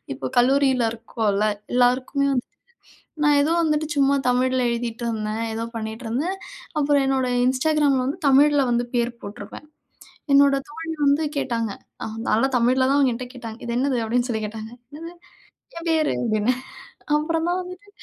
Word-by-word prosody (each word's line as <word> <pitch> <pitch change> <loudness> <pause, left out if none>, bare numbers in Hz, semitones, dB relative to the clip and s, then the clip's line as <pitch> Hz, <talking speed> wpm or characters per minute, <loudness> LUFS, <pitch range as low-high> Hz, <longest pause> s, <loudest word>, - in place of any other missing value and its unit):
இப்போ 130 - -4
கல்லூரியில 260 -2 +3
இருக்கோம்ல 220 -2 -1 0.3
எல்லாருக்குமே 255 +3 +2
வந் 250 - +1 0.8
நான் 295 -1 +5
ஏதோ 305 +3 +1
வந்துட்டு 310 -1 0
சும்மா 280 0 +3
தமிழ்ல 255 +1 +2
எழுதிட்டு 235 0 -3
இருந்தேன். 215 -1 -3
ஏதோ 225 - -3
பண்ணிட்டு 220 +2 -5
இருந்தேன். 315 +12 -2 0.4
அப்புறம் 285 -1 +3
என்னோட 265 -1 +1 0.2
இன்ஸ்டாகிராமில 275 0 +2
வந்து 280 +7 -2
தமிழ்ல 285 +1 +5
வந்து 240 0 +1
பேர் 240 0 +1
போட்டிருப்பேன். 205 +8 -9 0.7
என்னோட 280 0 +6
தோழி 325 +2 -6
வந்து 285 +3 +3
கேட்டாங்க, 230 -5 -1 0.3
அ - - -3 0.2
நல்ல 225 - +2
தமிழ்ல 255 +2 +3
தான் 285 - +3
என்கிட்ட 250 +2 -5
கேட்டாங்க. 230 -3 -8
"இது 235 - -3
என்னது?" 265 0 +1
அப்படின்னு 240 +2 0
சொல்லி 220 -2 -2
கேட்டாங்க. 220 +1 -7 0.3
"என்னது? 335 +2 -8 0.6
என் 335 - -7
பேரு!" 315 -2 +2
அப்படின்னேன். 235 +2 0 0.6
அப்புறம் 325 +2 -1
தான் 365 +1 0
வந்துட்டு 365 +3 -11
255 Hz, 150 wpm, -23 LUFS, 235-290 Hz, 0.8 s, என்னோட